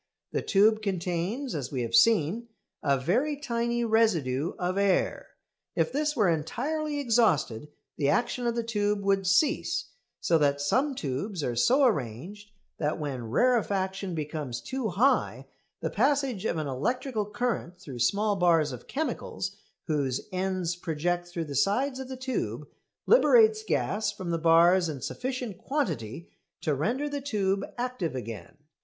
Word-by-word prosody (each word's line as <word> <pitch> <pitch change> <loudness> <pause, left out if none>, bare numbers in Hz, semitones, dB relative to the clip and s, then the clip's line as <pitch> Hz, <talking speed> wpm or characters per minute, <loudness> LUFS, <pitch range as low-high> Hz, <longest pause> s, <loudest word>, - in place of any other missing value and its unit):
The - - -1
tube 215 +2 +3
contains, 190 +6 -2
as 135 -4 -4
we 130 -4 -2
have 115 0 -5
seen, 220 - +4 0.3
a 140 -2 +2
very 250 - 0
tiny 235 -3 -1
residue 170 - +1
of 180 +1 -1
air. 200 -2 +1 0.5
If - - +1
this 300 +1 0
were 210 -7 +3
entirely 290 - -1
exhausted 220 - +2 0.3
the 140 -2 +1
action 240 +8 0
of 235 - 0
the 235 - -1
tube 210 -2 0
would 195 -1 +1
cease; 280 - +2 0.3
so 165 -1 +2
that 140 -1 +2
some 265 - +1
tubes 155 - -3
are 120 - -1
so 260 - +4
arranged 185 - -2 0.3
that 150 0 0
when 130 -7 -4
rarefaction 195 - +1
becomes 150 -5 -4
too 255 - -3
high 230 +10 +1 0.4
the - - -2
passage 270 -7 +1
of 170 - 0
an 155 - -2
electrical 215 - -2
current 210 -5 -2
through 140 -10 -9
small 205 - +2
bars 165 -5 +3
of 125 -2 -9
chemicals, 245 -8 -3 0.3
whose 140 -6 -1
ends 185 -2 -1
project 175 +1 -2
through 175 -2 -4
the 145 - -7
sides 255 - +1
of 265 -1 -6
the 260 - -6
tube, 150 - -3 0.4
liberates 450 -2 +5
gas 220 - 0
from 180 -3 -5
the 165 - 0
bars 170 +2 +5
in 145 -3 -5
sufficient 250 - -4
quantity 175 - -3 0.3
to 155 - 0
render 230 - -1
the 285 -1 -4
tube 200 -7 0
active 245 - -2
again. 115 -4 -7
195 Hz, 150 wpm, -28 LUFS, 155-240 Hz, 0.5 s, liberates